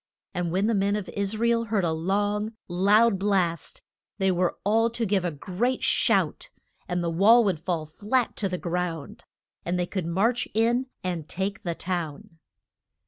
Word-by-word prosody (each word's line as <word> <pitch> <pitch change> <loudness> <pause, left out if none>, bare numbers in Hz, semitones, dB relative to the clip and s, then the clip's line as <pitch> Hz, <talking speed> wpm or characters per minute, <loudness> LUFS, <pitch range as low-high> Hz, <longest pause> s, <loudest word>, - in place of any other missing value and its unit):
And 175 -2 -2
when 190 +3 +1
the 230 - +2
men 200 0 +1
of 205 -3 -4
Is 200 +1 -2
ra 235 +2 +1
el 230 0 +2
heard 210 -3 0
a 165 - +1
long 205 +6 -1
loud 200 +4 +3
blast 185 -5 -1 0.3
they 190 -2 +2
were 180 0 0
all 225 +3 +3
to 230 0 -2
give 195 -2 +1
a 175 - 0
great 185 - -2
shout - - +1 0.4
and 175 -1 -1
the 170 - 0
wall 215 +8 +6
would 190 -7 0
fall 165 -1 -2
flat 215 - -1
to 195 - 0
the 180 - -2
ground, 175 -3 -4 0.4
and 175 +1 -1
they 180 - 0
could 180 -2 -4
march 225 +8 +1
in 240 +4 +2 0.2
and 175 -4 -3
take 195 +2 -3
the 170 -2 -3
town. 165 -3 -4
190 Hz, 180 wpm, -26 LUFS, 175-215 Hz, 0.4 s, wall